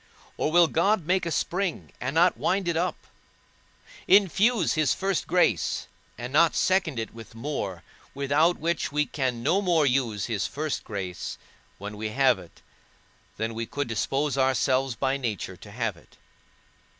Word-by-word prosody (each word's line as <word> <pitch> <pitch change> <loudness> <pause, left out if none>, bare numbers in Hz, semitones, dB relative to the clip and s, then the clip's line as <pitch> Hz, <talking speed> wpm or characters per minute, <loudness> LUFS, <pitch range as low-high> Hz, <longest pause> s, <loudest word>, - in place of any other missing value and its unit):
or 155 - -1
will 175 +1 +6
God 190 +2 +1
make 180 0 +1
a - - 0
spring, 180 +2 -2
and 130 +4 -3
not 175 +2 +5
wind 190 0 0
it 170 - +1
up? 175 0 -2 1.0
Infuse 200 +1 +4
his 155 -4 +2
first 195 -2 -1
grace, 180 +1 +1 0.3
and 125 +2 -6
not 165 +3 +4
second 185 -7 +1
it 115 -1 -4
with 115 0 -12
more, 115 - -4 0.3
without 145 +5 +2
which 170 +1 -1
we 150 +1 +1
can 125 -3 -2
no 175 +9 +2
more 170 -6 +3
use 125 -7 0
his 110 -4 -1
first 150 +1 -3
grace 95 -5 -5 0.4
when 105 +1 -7
we 110 +1 -3
have 130 -2 +3
it, 90 -2 -16 0.7
than 110 +1 -2
we 115 0 -4
could 145 -1 -3
dispose 135 +5 -1
ourselves 130 -1 +2
by 135 +4 0
nature 105 -7 -4
to 100 +3 -13
have 115 -1 -2
it? 85 - -21
140 Hz, 160 wpm, -26 LUFS, 115-170 Hz, 1.0 s, will